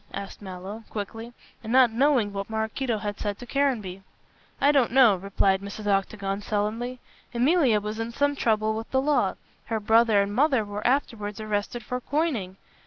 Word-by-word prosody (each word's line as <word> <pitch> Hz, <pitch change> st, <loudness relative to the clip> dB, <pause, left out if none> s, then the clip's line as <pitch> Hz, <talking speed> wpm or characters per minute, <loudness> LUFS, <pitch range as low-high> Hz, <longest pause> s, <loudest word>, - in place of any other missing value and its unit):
asked 200 Hz, +1 st, -7 dB
Mallow, 195 Hz, +3 st, -8 dB
quickly, 225 Hz, +3 st, -6 dB, 0.3 s
and 220 Hz, -, -5 dB
not 255 Hz, -2 st, +6 dB
knowing 240 Hz, -4 st, +2 dB
what 200 Hz, +1 st, -4 dB
Maraquito 220 Hz, +2 st, -2 dB
had 205 Hz, -1 st, -5 dB
said 205 Hz, -1 st, -3 dB
to 245 Hz, -, -9 dB
Caranby. 235 Hz, -9 st, -1 dB, 0.6 s
"I 285 Hz, -, +5 dB
don't 270 Hz, -6 st, +3 dB
know," 245 Hz, -5 st, +6 dB
replied 195 Hz, 0 st, +1 dB
Mrs. 200 Hz, +1 st, -7 dB
Octagon, 195 Hz, 0 st, -1 dB
sullenly, 225 Hz, +5 st, -2 dB, 0.4 s
"Emilia 255 Hz, -3 st, +3 dB
was 210 Hz, +2 st, -5 dB
in 225 Hz, +1 st, -3 dB
some 285 Hz, +4 st, +1 dB
trouble 220 Hz, -4 st, +1 dB
with 225 Hz, +1 st, -5 dB
the 265 Hz, -, +2 dB
law. 290 Hz, +2 st, +1 dB, 0.3 s
Her 225 Hz, -1 st, -2 dB
brother 220 Hz, 0 st, +4 dB
and 200 Hz, +1 st, -4 dB
mother 265 Hz, -3 st, +2 dB
were 205 Hz, +2 st, -3 dB
afterwards 225 Hz, -6 st, -1 dB
arrested 215 Hz, +2 st, -3 dB
for 250 Hz, +3 st, -4 dB
coining. 255 Hz, -, -1 dB
220 Hz, 170 wpm, -26 LUFS, 205-250 Hz, 0.6 s, not